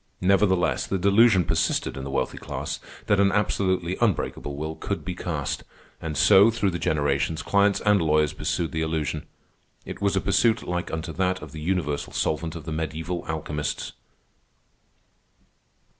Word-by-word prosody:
Nevertheless 95 -1 +2
the 95 - 0
delusion 100 +1 +5
persisted - - 0
in 65 - -6
the 70 - -5
wealthy 70 - -2
class - - -5 0.3
that 105 - +2
an 100 0 +4
absolutely 95 -3 0
unbreakable 85 -8 0
will 80 +2 -4
could - - -4
be - - -3
cast; - - -3 0.4
and 80 -2 -4
so, 100 +9 +7
through 110 -4 0
the 85 - -4
generations, 75 +1 0
clients 100 0 +2
and 105 -2 +3
lawyers 75 -1 +2
pursued 85 +1 -2
the 80 - -2
illusion. 80 -1 -2 0.6
It - - -8
was - - +1
a - - +3
pursuit 115 -1 +2
like 90 0 -2
unto 80 +1 -4
that 95 -1 0
of 75 - -9
the 75 +1 -8
Universal 80 -4 -2
Solvent 80 +1 -1
of 80 -3 -8
the 80 - -5
mediæval 80 +3 -4
alchemists. 75 -2 -3
85 Hz, 160 wpm, -25 LUFS, 75-95 Hz, 0.6 s, so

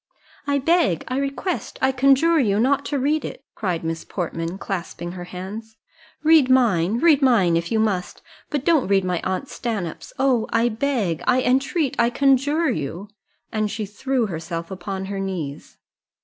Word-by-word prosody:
"I 285 0 +2
beg, 290 - +2
I 255 +1 -1
request, 280 +6 -3
I 265 - +3
conjure 275 +5 +4
you 205 -6 +2
not 265 +4 +2
to 285 - -1
read 295 +4 +1
it!" - - -7
cried 180 -6 -2
Miss 165 0 -3
Portman, 170 -1 -4
clasping 175 -3 -5
her 180 -1 -7
hands. 205 +5 -8 0.5
"Read 310 -4 +5
mine, 220 -6 +3
read 300 +1 +4
mine, 215 -11 +4
if 170 0 -1
you 225 - +2
must, 195 -5 -1 0.3
but 290 -1 -2
don't 320 - +3
read 195 -1 +2
my 180 -2 -1
aunt 190 +8 -2
Stanhope's 190 -12 -4
Oh! 255 -4 +2
I 230 +1 +2
beg, 220 - -1
I 255 0 +3
entreat, 270 +3 +1
I 235 0 +4
conjure 280 +4 +2
you!" 170 - -4 0.4
and 215 -1 0
she 215 0 -3
threw 250 +4 -1
herself 165 -2 -5
upon 190 +1 -5
her 195 0 -4
knees. 175 -8 -5
225 Hz, 165 wpm, -22 LUFS, 180-270 Hz, 0.5 s, Read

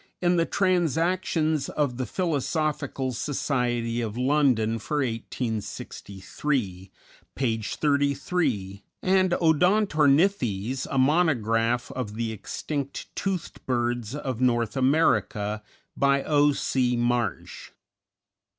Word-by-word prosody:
in 175 0 +2
the 165 -1 +2
"Transactions 165 -4 +1
of 140 -5 -1
the 130 - -3
Philosophical 155 -5 -1
Society 120 -3 -1
of 110 -1 -4
London 125 -5 +2
for 150 +8 -3
1863," 110 -3 -3 0.5
page 115 -5 -1
33, 140 - 0 0.2
and 185 -1 +3
"Odontornithes, 155 - +2
a 135 - -2
Monograph 120 -6 +2
of 115 -5 -5
the 115 0 -2
Extinct 140 +6 -5
Toothed 190 -4 -3
Birds 120 -1 -1
of 130 -5 -4
North 120 -2 +1
America," 115 -7 +1 0.3
by 140 0 +2
O. 145 -1 +3
C. 125 -3 0
Marsh. 120 -4 -2
130 Hz, 95 wpm, -26 LUFS, 115-155 Hz, 0.5 s, and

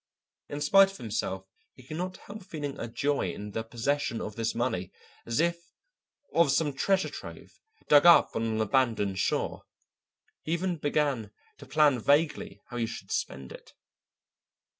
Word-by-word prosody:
In 145 0 -5
spite 195 +6 +6
of 195 - -11
himself 100 -4 -3 0.3
he 130 - -15
could 155 +5 -7
not 185 +1 -4
help 205 0 -10
feeling 150 -6 -5
a - - -4
joy 135 -5 -1
in 105 +4 -7
the 110 - -3
possession 120 +2 -1
of 105 - -6
this 115 0 -2
money 115 -7 -2 0.4
as 115 0 -1
if 170 +1 +2 0.7
of 170 -3 +4
some 145 +1 +1
treasure 190 +8 +1
trove - - -10 0.3
dug 145 +3 +7
up 170 - +7
on - - 0
an 110 -1 0
abandoned 110 -5 +1
shore. - - -1 0.8
He 160 - -2
even 175 0 -1
began 145 -7 0 0.3
to - - -12
plan 150 -5 +4
vaguely 145 +6 +1
how 120 - -6
he 115 -1 0
should - - -8
spend 65 -1 -3
it. - - -13
140 Hz, 160 wpm, -28 LUFS, 115-160 Hz, 0.8 s, dug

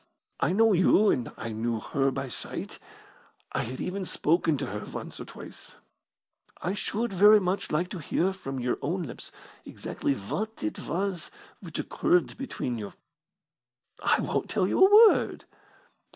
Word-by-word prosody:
I - - +2
know 220 +3 +4
you, 195 +3 +5
and 120 - -1
I 115 - -5
knew 115 +1 -2
her 135 +4 0
by 135 0 -3
sight 125 - -5 0.7
I - - -1
had 130 +3 -5
even 190 +2 -3
spoken 165 -3 +1
to - - -3
her 105 +2 -4
once - - -7
or - - -6
twice. - - -10 0.8
I 180 - -2
should 215 +2 -2
very 210 +3 +7
much 185 0 -2
like 170 +4 +1
to 185 - -6
hear 175 +5 0
from 135 -8 -6
your 125 0 -1
own 175 +5 -1
lips 140 - -8 0.3
exactly 140 - -3
what 210 - -4
it 105 - -3
was 180 +1 -2 0.3
which - - -8
occurred 350 +2 +1
between 125 - -4
you." 105 -2 -7 1.1
"I - - +3
won't - - -2
tell 185 - +1
you 380 - +4
a 420 +3 +9
word." - - -1
175 Hz, 160 wpm, -28 LUFS, 130-200 Hz, 1.1 s, a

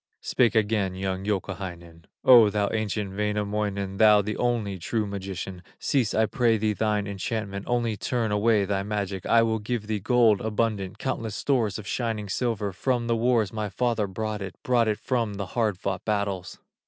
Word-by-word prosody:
Spake 120 -3 +2
again 105 -3 +1
young 95 0 -3
Youkahainen: 90 -5 -4 0.2
"O 120 -4 +8
thou 100 0 0
ancient 105 -2 -2
Wainamoinen, 105 -1 -2
Thou 105 -1 +6
the 105 +1 -3
only 115 -6 -1
true 110 +5 -1
magician, 95 -2 -5 0.2
Cease 125 -6 0
I 110 - +4
pray 115 +1 +2
thee 105 0 0
thine 105 -1 0
enchantment, 100 0 -4
Only 120 -2 0
turn 115 -2 -1
away 105 0 +3
thy 100 0 -1
magic, 100 -2 -3
I 115 0 +5
will 110 -1 0
give 110 +1 -3
thee 110 -1 -2
gold 115 -1 +3
abundant, 105 -3 -1
Countless 115 -5 -3
stores 120 -7 0
of 110 - -8
shining 110 -2 -2
silver; 105 -2 -1
From 120 +4 0
the 115 0 +1
wars 115 -3 +1
my 105 -1 -2
father 115 0 0
brought 105 +2 -4
it, 95 -1 -6
Brought 120 -3 +3
it 105 -1 +1
from 115 -5 -1
the 100 0 -3
hard 110 -5 +1
fought 95 0 -3
battles." 100 -4 -2
105 Hz, 175 wpm, -26 LUFS, 100-115 Hz, 0.2 s, O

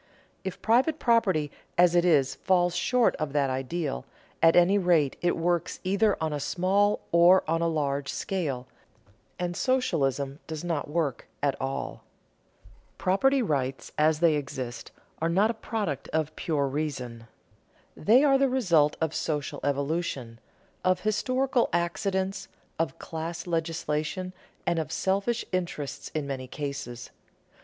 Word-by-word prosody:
If 190 -2 -6
private 260 +8 +3
property 200 - +2 0.3
as 175 0 +5
it 175 -1 +4
is, 150 -7 +3
falls 180 -2 +1
short 250 -2 +2
of 155 -3 -3
that 140 -2 +2
ideal, 135 - -2 0.4
at 165 0 +6
any 180 +3 +5
rate 170 -7 +3
it 175 - +1
works 170 0 0
either 200 +2 +2
on 160 -1 -1
a 145 - -2
small 195 +7 +1
or 175 +2 +6
on 165 +1 +1
a 170 - +2
large 140 -4 -1
scale, 145 -10 -3 0.7
and 175 -1 -2
socialism 145 - 0
does 160 0 -5
not 165 -5 -2
work 150 -5 -1 0.2
at 140 -2 +2
all. 135 +1 -4 0.9
Property 265 +8 +2
rights 135 - -2
as 155 +1 +2
they 170 -2 +5
exist 130 -4 -6 0.3
are 165 - +1
not 200 +6 +3
a - - -5
product 210 - -3
of 155 0 -2
pure 145 -4 0
reason. 130 -5 -4 0.7
They 235 - +5
are 275 -2 +5
the 275 -1 +3
result 170 - +3
of 160 -1 -1
social 150 -3 -2
evolution, 140 -4 -2 0.4
of 185 0 +2
historical 255 +4 +1
accidents, 190 +3 -1 0.3
of 160 -5 -1
class 165 +1 -5
legislation, 165 +1 -2 0.3
and 170 - +1
of 160 - -4
selfish 200 +5 0
interest 170 -6 -3
in 155 -2 -1
many 135 -2 -5
cases. 140 -4 -6
165 Hz, 140 wpm, -27 LUFS, 145-190 Hz, 0.9 s, at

